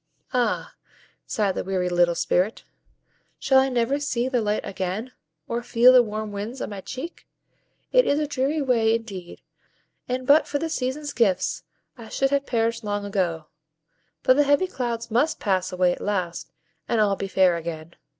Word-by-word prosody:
"Ah!" 245 -1 0 0.5
sighed 205 -3 0
the - - -3
weary 185 -1 -1
little 175 -1 +2
Spirit, 185 +5 0 0.7
"shall 265 -1 +4
I 265 0 +2
never 250 +3 0
see 255 -4 -1
the 255 -2 0
light 210 0 -1
again, 195 +5 -4 0.4
or 235 +1 -2
feel 240 +1 +5
the 255 - +8
warm 215 -1 -4
winds 210 +6 -5
on - - -4
my 200 -1 -6
cheek? 265 - -8 0.6
It - - +4
is 285 - +2
a 305 - 0
dreary 285 +2 -1
way 230 -4 +3
indeed, 195 -6 -7 0.7
and 255 +1 -2
but 290 +4 +5
for 285 - -1
the 325 +3 -3
Seasons' 285 0 -3
gifts 195 -6 +1 0.4
I 225 -1 -10
should 270 0 0
have 280 0 0
perished 230 -1 0
long 205 -1 -2
ago; 180 -6 -1 0.8
but 255 - +5
the 290 - +5
heavy 285 +5 +3
clouds 240 -9 -4
MUST 270 +8 +1
pass 185 -2 0
away 180 -1 +2
at - - -5
last, 185 -4 -3 0.4
and 235 - +1
all 205 -2 +3
be 195 - -4
fair 185 -2 +3
again. 165 0 -6
230 Hz, 175 wpm, -24 LUFS, 195-260 Hz, 0.8 s, the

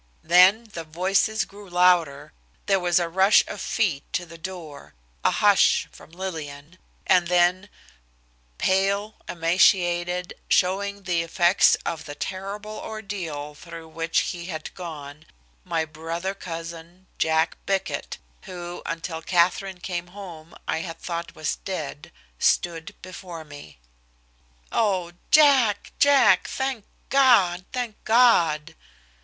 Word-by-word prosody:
Then 180 +6 +6
the 165 - -5
voices 190 +6 0
grew 200 -1 -14
louder, 175 -5 +2 0.3
there 195 -1 +2
was 175 0 +2
a 175 -1 +1
rush 190 +4 +5
of 205 - -6
feet 175 -11 0
to 175 - -1
the 170 0 -13
door, 165 -4 -9 0.3
a - - +4
"Hush!" - - +3
from - - -16
Lillian, 160 -3 -7 0.3
and 180 -2 +4
then, 180 +3 +2 0.9
pale, 200 +3 +1 0.2
emaciated, 175 0 +2 0.2
showing 200 +2 +1
the 175 -2 0
effects 175 +2 +4
of 160 -2 -4
the 145 -2 -8
terrible 205 +4 -6
ordeal 185 -9 -6
through 165 +1 -11
which 165 +1 0
he 175 -1 -5
had 155 -4 -6
gone, 155 -4 -9 0.4
my 160 - -1
brother 165 +4 -5
cousin, 170 0 -8
Jack 160 0 +1
Bickett, 195 -1 -2 0.3
who, 175 -1 -7
until 165 0 -4
Katherine 180 +2 +1
came 175 -1 -4
home, 175 -4 -11
I - - 0
had 165 0 -6
thought 170 -1 -5
was 155 -1 -2
dead, 155 -6 -6 0.3
stood 165 -2 0
before 175 -3 -9
me. 145 - -12 0.9
"Oh! 185 -6 0 0.2
Jack, 270 -9 +4
Jack. 285 -1 +5
Thank 265 -5 -3 0.3
God! 205 -10 +4
Thank 245 -4 -5
God!" 170 -10 +3
175 Hz, 120 wpm, -24 LUFS, 165-195 Hz, 0.9 s, Then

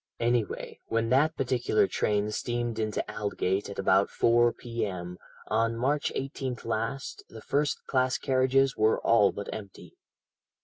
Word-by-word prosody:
Anyway, 115 -3 -1
when 115 0 0
that 150 +6 +3
particular 125 -5 +2
train 105 +1 0
steamed 120 0 -2
into 110 -1 -1
Aldgate 100 -2 -2
at 100 - -8
about 100 0 +3
4 120 0 +3
p.m. 95 -8 -5 0.3
on 115 +1 0
March 140 +5 0
18th 135 -3 -4
last, 115 +4 -3
the 110 - -10
first 145 +5 -1
class 130 -1 +1
carriages 135 0 +2
were 110 +1 +3
all 105 -3 +4
but 100 - -6
empty. 100 -3 -10
115 Hz, 135 wpm, -28 LUFS, 105-130 Hz, 0.3 s, all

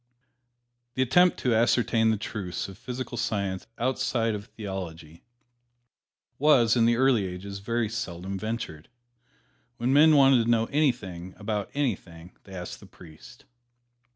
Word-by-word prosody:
The 130 - +2
attempt 180 +8 +4
to 125 - +1
ascertain 115 0 +3
the 110 - +1
truths 100 -4 -5
of 95 - -10
physical 125 +1 -6
science 100 -3 -2
outside 120 -2 0
of 105 -1 -5
theology 85 -6 -7 1.2
was, 130 -6 +5
in 115 -2 +4
the 120 0 +3
early 125 -4 +3
ages, 100 +2 -7
very 115 +3 -1
seldom 95 -4 -5
ventured. 110 -8 -5 0.9
When 125 +3 0
men 155 +2 +7
wanted 135 -4 +6
to - - -1
know 115 -1 +3
anything 100 - -1
about 105 -1 -3
anything, 90 - -3
they 95 - -11
asked 90 -1 -7
the - - -14
priest. 80 -3 -15
110 Hz, 135 wpm, -27 LUFS, 95-125 Hz, 1.2 s, men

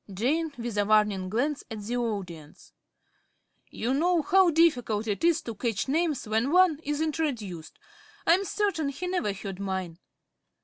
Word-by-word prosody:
~Jane~ 290 - 0
(with 235 -3 -3
a - - +4
warning 210 -3 +2
glance 280 +8 -1
at 220 -2 -6
the 235 +4 -3
audience). 190 -10 -5 1.0
You 240 +4 -2
know 335 +3 +2
how 375 +3 +5
difficult 250 -10 +2
it 205 +3 -3
is 335 -1 +3
to 230 - -5
catch 220 +1 -2
names 310 -3 0
when 225 +6 0
one 360 -4 +4
is 295 0 -2
introduced. 245 - -3 0.5
I 330 - +6
am 380 +3 +2
certain 395 -6 -1
he 280 +6 -5
never 360 - -1
heard 195 -1 -7
mine. 190 -3 -4
245 Hz, 160 wpm, -27 LUFS, 205-320 Hz, 1.0 s, I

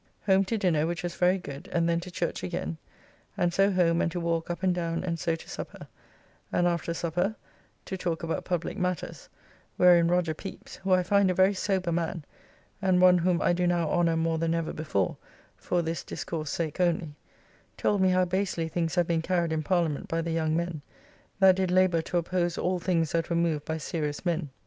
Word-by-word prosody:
Home 195 -1 +4
to 225 +4 -1
dinner, 165 -6 +1
which 175 0 -3
was 175 -1 -3
very 180 +2 +3
good, 160 +1 -9
and 170 -1 +1
then 170 0 +2
to 180 +2 -8
church 175 -1 -3
again, 170 -2 -4 0.6
and 175 -1 +1
so 195 +2 +4
home 175 -3 +2
and 165 - 0
to 175 - -3
walk 170 -1 -1
up 175 +2 -4
and 185 -1 +3
down 170 -1 -2
and 170 -2 -2
so 165 +1 0
to 165 - -12
supper, - - -8 0.6
and 175 - +2
after 170 -1 -1
supper 175 +5 -1 0.5
to 190 - -4
talk 170 -2 -3
about 165 0 -2
publique 175 -2 -3
matters, 180 -3 -3 0.5
wherein 175 -2 +6
Roger 175 -2 +1
Pepys 195 +5 -9
(who 195 0 -2
I 185 0 +5
find 200 +1 +3
a 185 - 0
very 190 +2 +4
sober 190 -2 -1
man, 165 -1 -2 0.6
and 185 -2 +3
one 180 0 +6
whom 175 0 +1
I - - +3
do 180 0 +1
now 170 -2 +1
honour 170 -2 +2
more 165 0 0
than 165 0 +1
ever 165 -1 -2
before 100 - -1 0.4
for 175 -1 -1
this 165 0 -3
discourse 155 -3 -5
sake 160 +1 -3
only) 170 -3 +1 0.6
told 205 -2 +1
me 190 - +4
how 185 0 +3
basely 180 -2 -1
things 165 0 -2
have 175 -1 +3
been 165 -1 0
carried 170 -1 0
in 155 - 0
Parliament 165 -2 0
by 165 0 -1
the 165 - -3
young 160 -1 0
men, 170 -3 -3 0.6
that 190 -1 +6
did 190 -1 0
labour 180 -2 +3
to 175 - -2
oppose 175 0 0
all 180 0 0
things 165 -3 0
that 165 -1 -1
were 170 - 0
moved 165 -3 0
by 160 0 -2
serious 150 0 -3
men. 170 -3 -1
170 Hz, 210 wpm, -28 LUFS, 165-180 Hz, 0.6 s, wherein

